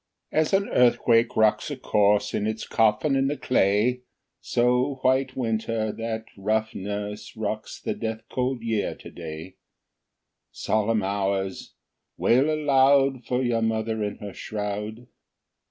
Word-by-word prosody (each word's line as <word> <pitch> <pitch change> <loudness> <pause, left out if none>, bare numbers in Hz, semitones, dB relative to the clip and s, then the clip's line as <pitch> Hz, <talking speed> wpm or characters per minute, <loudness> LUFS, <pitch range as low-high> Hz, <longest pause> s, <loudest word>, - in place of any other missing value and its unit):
2. - - -4
As 155 - +1
an 195 +1 +3
earthquake 120 -1 +3
rocks 110 -1 +3
a - - -4
corse 105 0 +2
In 105 - 0
its 110 0 -3
coffin 115 +6 +2
in 135 0 +2
the 145 +1 -2
clay, 115 +2 +2 0.4
So 125 +3 +1
White 130 0 +2
Winter, 115 -3 -1
that 115 0 -4
rough 110 +2 -1
nurse, 105 +1 -5
Rocks - - -4
the - - -2
death 110 0 -4
cold 125 -1 -2
Year 110 -3 -1
to - - -12
day; 80 +2 -8 1.0
_10 - - -20
Solemn 110 0 +1
Hours! 95 -1 -2 0.4
wail 135 +6 +3
aloud 135 -3 +3
For 125 +1 0
your 120 -2 +1
mother 110 0 -1
in 105 - -3
her 100 -2 -8
shroud. 105 +2 -5
110 Hz, 140 wpm, -25 LUFS, 105-125 Hz, 1.0 s, an